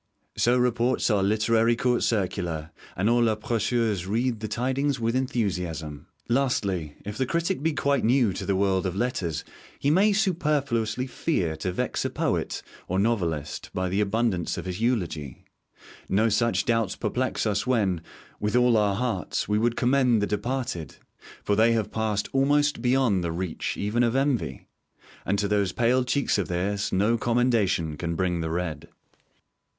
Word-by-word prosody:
So 120 +1 +3
reports 125 0 +1
our 105 -2 +2
literary 110 +3 +2
'Court 125 +1 +1
Circular,' 90 -7 -1 0.3
and 95 +4 +1
all 120 0 +4
our 110 - +1
Précieuses 110 -3 -1
read 115 +3 0
the 110 - -4
tidings 130 +4 -1
with 115 +1 0
enthusiasm. 90 - -2 0.2
Lastly, 100 - 0
if 105 +3 -6
the 130 - +1
critic 170 +3 -1
be 160 +1 +1
quite 140 -2 +1
new 120 -3 +3
to 95 - -5
the 100 - +2
world 95 -1 +1
of 90 - -4
letters, 95 -9 -2 0.3
he 140 - +1
may 195 +6 +4
superfluously 145 - 0
fear 95 - -1
to 90 +4 -2
vex - - -2
a - - -1
poet - - -2 0.2
or 95 - -1
a - - +2
novelist 85 -10 -1
by 90 0 -1
the 95 +3 +1
abundance 105 -4 0
of - - -5
his 90 +3 -4
eulogy. 85 - -2 0.6
No 110 +4 +3
such 115 +2 +1
doubts 115 -5 +1
perplex 120 +4 -1
us 105 +2 0
when, 100 -9 +1 0.4
with 105 +2 -1
all 125 -2 +4
our 100 -2 +2
hearts, 115 -5 -2
we 105 +1 +1
would 120 +1 +1
commend 125 -2 +3
the 105 - +1
departed; 105 - -3 0.5
for 105 - +1
they 115 +2 +4
have 110 -2 -1
passed 110 -2 -1
almost 145 +2 +2
beyond 125 -7 +2
the 85 - -1
reach 85 0 -3
even 105 +4 0
of 120 0 +2
envy; 135 - 0 0.6
and 100 - +1
to 100 0 0
those 100 -2 +1
pale 125 +4 +2
cheeks 125 -3 +1
of 100 - -1
theirs 100 +3 -1
no 105 +5 +2
commendation 110 -10 +1
can 85 +1 -3
bring 90 -1 0
the 80 - -2
red. 80 -3 -3
110 Hz, 165 wpm, -26 LUFS, 95-125 Hz, 0.6 s, all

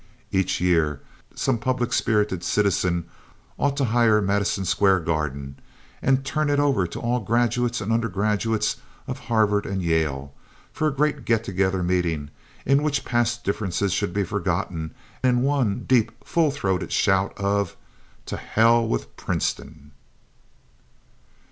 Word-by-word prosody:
Each 95 -1 +1
year 80 -5 +1 0.3
some 125 -4 0
public 125 0 -1
spirited 105 -5 +1
citizen 90 -4 +1 0.5
ought 140 -1 +1
to 140 - +2
hire 115 -3 +4
Madison 100 -1 0
Square 95 +1 +3
Garden 70 -4 -3 0.4
and 135 0 +2
turn 155 +1 0
it 145 0 +2
over 135 -11 +2
to - - -7
all 120 +1 0
graduates 120 +2 0
and 110 +2 -1
undergraduates 105 0 0 0.3
of - - -5
Harvard 105 -3 +2
and 100 - -3
of 95 - -2
Yale 75 -5 -1 0.4
for 155 - 0
a - - +1
great 145 -1 0
get 115 -1 +1
together 95 -1 0
meeting 85 -5 -1 0.3
in 140 +2 +4
which 145 -1 -1
past 120 -1 0
differences 100 -1 -1
should - - -1
be 100 +2 0
forgotten 80 -3 -2 0.3
in 125 -1 +3
one 135 -8 +1
deep 120 -4 +4
and 115 +2 -26
full 165 -3 +2
throated 95 -10 -2
shout 95 0 +1
of 100 0 -1 0.5
"To - - -4
Hell 115 +1 +3
with - - -3
Princeton!" 75 -2 -3
105 Hz, 140 wpm, -24 LUFS, 90-120 Hz, 0.5 s, hire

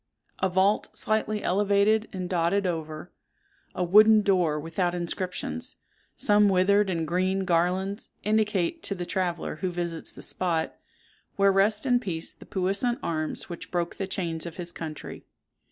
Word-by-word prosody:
A 190 - +1
vault, 190 +3 +2
slightly 215 -1 0
elevated 205 +3 +2
and 185 -2 -4
dodded 180 +3 +1
over—a 175 - -6
wooden 215 +4 +6
door 180 -7 +2
without 175 +3 -1
inscriptions—some 180 - -1
withered 195 +2 +3
and 165 -3 -1
green 185 +3 0
garlands, 185 +4 0
indicate 210 - +1
to 200 - -2
the 175 -1 -4
traveller 175 -4 -2
who 185 +3 -2
visits 170 -2 -3
the - - -10
spot, 165 -3 -1 0.6
where 200 0 +4
rest 210 +4 +2
in 245 -2 +3
peace 175 -8 -4
the - - -16
puissant 200 +6 0
arms 155 -2 -3
which 175 -2 -8
broke 175 -1 -2
the 195 - -3
chains 170 -4 -3
of 170 - -8
his 175 -1 -4
country. 155 -3 -7
185 Hz, 140 wpm, -27 LUFS, 170-205 Hz, 0.6 s, wooden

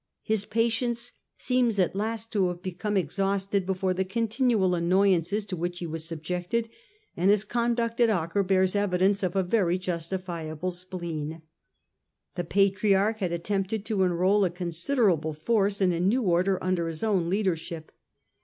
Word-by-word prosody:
His 215 -2 0
patience 235 +2 0 0.3
seems 250 -4 +1
at 185 -1 +1
last 225 +2 -3
to 195 -4 +2
have 180 0 -5
become 190 +3 -2
exhausted 195 0 0
before 190 -1 0
the 190 +1 0
continual 225 -1 +1
annoyances 185 +2 +2
to 190 - -4
which 175 +1 -3
he 175 - -4
was 160 -1 -4
subjected, 180 +7 -3 0.5
and 180 +3 +2
his 205 0 +4
conduct 235 +1 -1
at 235 - +5
Acre 180 -1 0
bears 190 0 +2
evidence 195 0 +2
of 185 -2 -1
a 190 - +2
very 180 -2 +1
justifiable 175 -2 -4
spleen. 170 -3 -6 0.9
The 175 - -3
Patriarch 195 +3 +2
had 185 -4 -1
attempted 195 +4 -2
to 215 -4 0
enrol 185 +3 +3
a 185 - +2
considerable 175 - 0
force 200 +5 +1
in 185 -2 +4
a 170 - -2
new 210 +8 +2
Order 185 +1 +2
under 185 -2 0
his 165 +2 -5
own 190 -6 +1
leadership. 175 -5 -2
190 Hz, 155 wpm, -27 LUFS, 175-210 Hz, 0.9 s, at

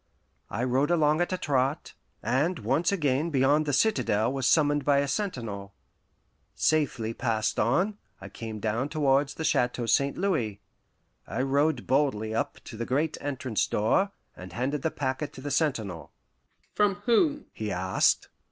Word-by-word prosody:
I 115 - -2
rode 130 +3 +1
along 155 -1 +3
at 175 - 0
a 185 - 0
trot, 140 -1 -1 0.3
and 160 +8 +1
once 135 - +1
again 150 -4 +1
beyond 145 +1 +2
the - - +1
citadel 130 - +2
was 135 -2 0
summoned 145 -2 +3
by 140 0 +3
a 140 0 +1
sentinel. 115 - -4 0.8
Safely 125 -8 +1
passed 110 -1 -1
on, 185 - +1 0.2
I - - -9
came 110 -2 -7
down 115 +6 -1
towards 140 -2 +1
the 160 - -4
Chateau 125 -4 +1
St. 140 +4 +2
Louis. 140 - -1 0.7
I 130 - -2
rode 140 0 +1
boldly 130 -6 +1
up 110 - -2
to 110 - -9
the 115 - -3
great 150 +4 0
entrance 130 -5 -1
door, 150 - +1 0.2
and 90 -1 -10
handed 130 +7 -2
the 160 - 0
packet 140 0 -3
to 130 - -10
the 145 +1 -4
sentinel. 110 - -1 0.6
"From 205 -2 +2
whom?" 290 +5 +2
he 105 -2 -4
asked. 95 +1 +2
135 Hz, 155 wpm, -27 LUFS, 115-155 Hz, 0.8 s, along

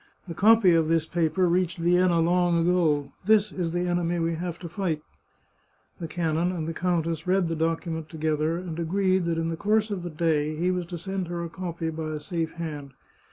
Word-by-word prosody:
The 170 - -5
copy 215 0 +5
of 165 -1 +2
this 165 -1 +2
paper 170 +2 +1
reached 180 0 +1
Vienna 175 0 +3
long 175 0 +2
ago. 165 -5 +2
This 210 -1 +4
is 175 -3 -2
the 175 +1 -1
enemy 175 0 0
we 165 0 0
have 170 +1 -4
to 175 - -8
fight! 165 -3 -2 0.5
" - - -40
The 165 - -4
canon 165 +1 0
and 165 -4 -3
the 165 - -3
countess 165 -1 -1
read 185 -1 +2
the 165 - -2
docu 165 0 -1
ment 160 -1 -5
together, 155 0 -1
and 170 -2 -6
agreed 185 +2 +1
that 170 -1 0
in 165 0 -1
the 165 - -2
course 215 +3 +1
of 195 -3 -2
the 175 - -5
day 155 -1 0
he 175 +4 +1
was 180 -2 -2
to 175 -1 -5
send 190 +1 -4
her 170 0 -4
a 170 - -5
copy 170 -1 -4
by 155 -1 -4
a 150 - -3
safe 165 0 -3
hand. 150 -5 -6
170 Hz, 215 wpm, -26 LUFS, 160-180 Hz, 0.5 s, copy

